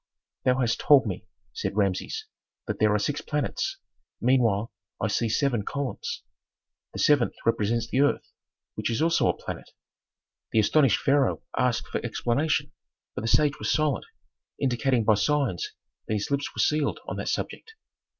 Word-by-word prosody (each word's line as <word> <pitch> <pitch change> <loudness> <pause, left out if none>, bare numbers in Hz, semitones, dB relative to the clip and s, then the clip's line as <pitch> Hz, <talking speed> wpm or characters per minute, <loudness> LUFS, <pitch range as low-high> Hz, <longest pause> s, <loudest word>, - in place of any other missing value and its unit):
"Thou 125 0 +4
hast 115 -2 +1
told 140 -3 +6
me," 95 -5 -5 0.3
said 100 - -3
Rameses, 100 -3 0 0.4
"that - - -4
there 110 0 +4
are 105 - +3
six 140 +8 -1
planets; 150 -3 -2 0.4
meanwhile 115 -4 +2 0.3
I - - 0
see 110 +2 0
seven 125 -1 +1
columns." 145 - -4 0.7
"The - - -9
seventh 145 -6 +3
represents 115 +1 +1
the 130 +3 +1
earth, 145 - +1 0.4
which - - -2
is 115 - -1
also 165 +1 +3
a - - 0
planet." - - -7 0.8
The 110 - +4
astonished 135 +2 +4
pharaoh 140 -1 +2
asked 125 -2 +1
for - - -3
explanation, 120 +6 0 0.4
but - - -4
the 115 - -3
sage 150 +4 +3
was - - -2
silent, 155 -3 +1 0.5
indicating 125 -2 +1
by 110 - +5
signs 130 - 0 0.4
that 110 - 0
his 105 +6 -3
lips 140 0 0
were - - +1
sealed 150 -2 +1
on - - -5
that - - -3
subject. 450 0 -4
125 Hz, 160 wpm, -26 LUFS, 110-145 Hz, 0.8 s, told